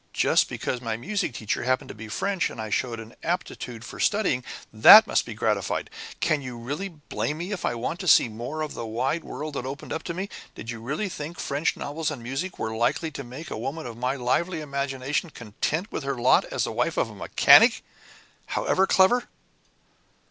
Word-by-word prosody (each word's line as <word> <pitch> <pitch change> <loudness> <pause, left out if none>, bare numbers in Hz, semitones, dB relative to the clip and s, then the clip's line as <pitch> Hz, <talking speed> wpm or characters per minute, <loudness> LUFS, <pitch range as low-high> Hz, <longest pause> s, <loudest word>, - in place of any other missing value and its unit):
Just - - +3
because 125 - -3
my 115 -2 -2
music 200 - -2
teacher 110 -3 -2
happened 130 +1 0
to - - -6
be 110 +1 -9
French 195 - -1
and - - -10
I 110 -1 -5
showed 115 0 -1
an 115 +1 -10
aptitude 125 -9 -4
for - - -9
studying, 195 -12 +1 0.3
that 205 - +10
must - - 0
be - - -6
gratified. - - -1 0.3
Can 155 -3 +1
you 125 -3 -7
really 145 +12 -4
blame 150 -2 -4
me 175 +5 -5
if 195 - -3
I - - -1
want 125 +9 -3
to 185 - -5
see 145 - +7
more 120 +8 -5
of 155 - -5
the - - -5
wide 125 +8 -1
world 150 0 -6
that 130 - -4
opened 140 +2 -6
up 160 - -3
to 170 - -4
me? 190 +3 -3 0.3
Did 115 - -6
you 115 -1 -7
really 150 - -2
think 165 -2 -6
French 145 +3 -1
novels 150 +2 -3
and 140 -6 -6
music 135 +10 -4
were 110 0 -3
likely 120 +8 0
to 140 - -6
make 135 +7 -9
a - - -3
woman 140 +7 -4
of 120 -2 -6
my 125 +3 -1
lively 160 +7 0
imagination 140 +1 -2
content 150 - -3
with - - -4
her 140 0 -2
lot 120 +1 +4
as - - -2
wife - - -1
of - - 0
a - - -11
mechanic - - +6 0.6
however 190 +1 +1
clever?" 240 +6 +4
140 Hz, 205 wpm, -26 LUFS, 120-170 Hz, 0.6 s, that